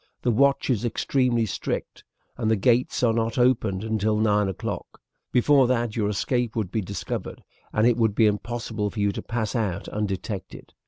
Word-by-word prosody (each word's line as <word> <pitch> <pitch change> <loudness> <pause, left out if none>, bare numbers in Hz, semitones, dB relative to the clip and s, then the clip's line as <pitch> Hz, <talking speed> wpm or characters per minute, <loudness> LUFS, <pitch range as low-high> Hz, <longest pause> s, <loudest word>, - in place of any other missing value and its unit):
The 120 - +2
watch 140 +3 +3
is 115 -2 0
extremely 120 0 +1
strict, 100 - -4 0.3
and 110 - -1
the 110 - +4
gates 120 +5 +2
are 115 -2 +4
not 115 +1 -1
opened 110 -6 +2
until 110 -1 0
nine 105 -2 +2
o'clock. 95 - -5 0.3
Before 135 +1 +4
that 120 -3 0
your 105 -2 0
escape 120 +3 -1
would 105 -5 -2
be 110 - 0
discovered, 100 -1 -5 0.3
and 105 - +2
it 120 -1 +4
will 115 -1 +4
be 105 +2 +2
impossible 105 0 -1
for 105 - -7
you 100 0 +2
to - - -5
pass 115 -2 -3
out 100 -5 -1
undetected. 100 -1 -5
110 Hz, 175 wpm, -25 LUFS, 105-120 Hz, 0.3 s, the